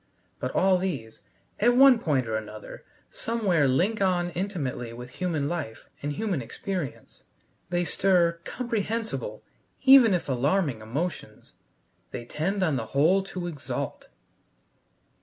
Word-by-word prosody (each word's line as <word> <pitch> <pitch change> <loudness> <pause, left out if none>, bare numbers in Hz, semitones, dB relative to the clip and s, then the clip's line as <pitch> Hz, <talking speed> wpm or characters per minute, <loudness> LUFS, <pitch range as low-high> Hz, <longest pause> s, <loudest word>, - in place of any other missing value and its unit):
But - - -2
all 190 -1 +4
these, 140 -13 -4 0.4
at 240 +3 +4
one 270 -2 +8
point 140 - +1
or 110 - -1
another, 110 0 -7 0.3
somewhere 195 -10 +1
link 185 +12 +1
on 175 -2 +1
intimately 155 - -3
with 125 +1 -9
human 165 -6 -1
life 150 -9 -4 0.2
and 145 +1 -2
human 185 -3 -1
experience. 175 - -6 0.5
They 175 0 +1
stir 175 -2 +2
comprehensible, 220 - -3 0.4
even 260 -7 +8
if 175 - -3
alarming, 140 - +1
emotions. 145 +11 -5 0.6
They 120 - -6
tend 190 +10 -1
on 155 -7 +1
the 115 -2 -4
whole 175 +7 +5
to 185 -2 -5
exalt. 160 -6 -5
175 Hz, 125 wpm, -27 LUFS, 135-195 Hz, 0.6 s, one